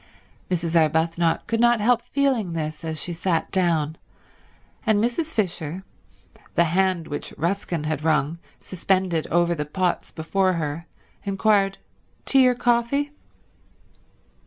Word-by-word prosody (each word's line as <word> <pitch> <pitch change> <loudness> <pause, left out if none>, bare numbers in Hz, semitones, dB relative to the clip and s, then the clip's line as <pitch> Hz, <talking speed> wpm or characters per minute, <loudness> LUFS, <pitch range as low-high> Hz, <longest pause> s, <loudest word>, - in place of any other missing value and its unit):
Mrs. 170 -2 -1
Arbuthnot 165 +1 +2
could 230 - -1
not 240 0 +4
help 235 +2 +3
feeling 245 -7 0
this 155 -1 -4
as 160 -1 -3
she 175 - -2
sat 170 -1 -1
down, 165 -4 +1 0.9
and 220 -3 +3
Mrs. 245 +9 0
Fisher, 180 - -2 0.7
the 170 - +5
hand 180 0 +1
which 145 - -5
Ruskin 170 -1 -1
had 155 -1 -2
wrung 155 +1 +1 0.2
suspended 185 -3 -1
over 175 0 +2
the 150 -3 -2
pots 175 +4 -2
before 185 +4 0
her, 165 0 -4 0.4
inquired, 195 -1 +2 0.5
"Tea 265 -2 +6
or 250 - +3
coffee?" 240 +5 +1
175 Hz, 125 wpm, -24 LUFS, 160-215 Hz, 0.9 s, Tea